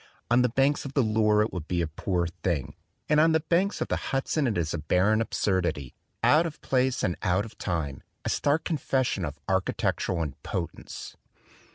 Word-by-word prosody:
On 120 +1 +5
the 125 - +3
banks 135 +4 +2
of 140 - -7
the 135 - +4
Loire 110 -1 +3
it 110 - -4
would 85 -4 -5
be 90 - 0
a - - -1
poor 85 +3 -1
thing; 85 -4 -2 0.3
and 150 0 +4
on 160 +1 +5
the 160 - +4
banks 175 +5 +1
of - - 0
the - - 0
Hudson 135 +2 0
it 110 - 0
is 80 -3 -1
a 85 - -2
barren 95 +8 +2
absurdity, 85 - -1 0.3
out 160 +3 +5
of 155 - -9
place 130 -1 +1
and 90 - +1
out 95 +3 +1
of 110 - -12
time, 80 -7 -2 0.2
a - - 0
stark 145 +3 +1
confession 130 - 0
of 75 -2 -4
architectural 95 -2 0
impotence. 80 +4 -6
105 Hz, 190 wpm, -27 LUFS, 85-135 Hz, 0.3 s, On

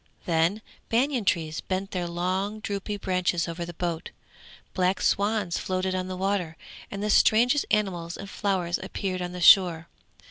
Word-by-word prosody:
Then 175 +4 +1 0.3
banian 250 -1 +1
trees 160 -3 0
bent 190 +1 -3
their 180 -2 -2
long 185 +5 -2
drooping 205 0 -4
branches 180 -3 0
over 170 +1 -4
the 175 - -8
boat, 170 -1 -3 0.6
black 185 0 +1
swans 205 -3 +1
floated 185 0 -1
on 185 0 -2
the 185 0 -5
water, 185 -4 -1 0.3
and 200 0 -5
the 210 - -1
strangest 245 +8 +4
animals 180 -5 -1
and 200 - -8
flowers 190 -4 -1
appeared 190 -1 -4
on 175 0 -3
the 180 - -7
shore. 170 -3 +6
185 Hz, 155 wpm, -26 LUFS, 175-200 Hz, 0.6 s, shore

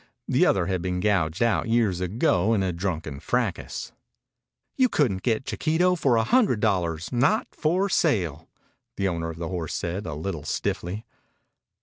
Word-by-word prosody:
The - - +3
other 95 -3 +2
had 95 -1 -1
been 90 0 -2
gouged 95 -1 +1
out 115 0 +1
years 110 -6 +2
ago 95 +2 +2
in 100 - +1
a 90 -2 -1
drunken 85 -5 -3
fracas. - - -2 0.8
"You 255 -1 +3
couldn't 105 - +1
get 115 +3 0
Chiquito 170 +3 +1
for 135 -8 +2
a 115 - +3
hundred 210 - +3
dollars. 85 -6 0
Not 135 - +2
for 175 +5 +1
sale," 90 - 0 0.5
the 100 - +1
owner 85 -2 -2
of 80 - -7
the 85 -1 -4
horse 85 -4 -3
said, 90 +5 -3
a - - -4
little 80 0 -4
stiffly. 90 +7 -3
95 Hz, 160 wpm, -25 LUFS, 85-120 Hz, 0.8 s, The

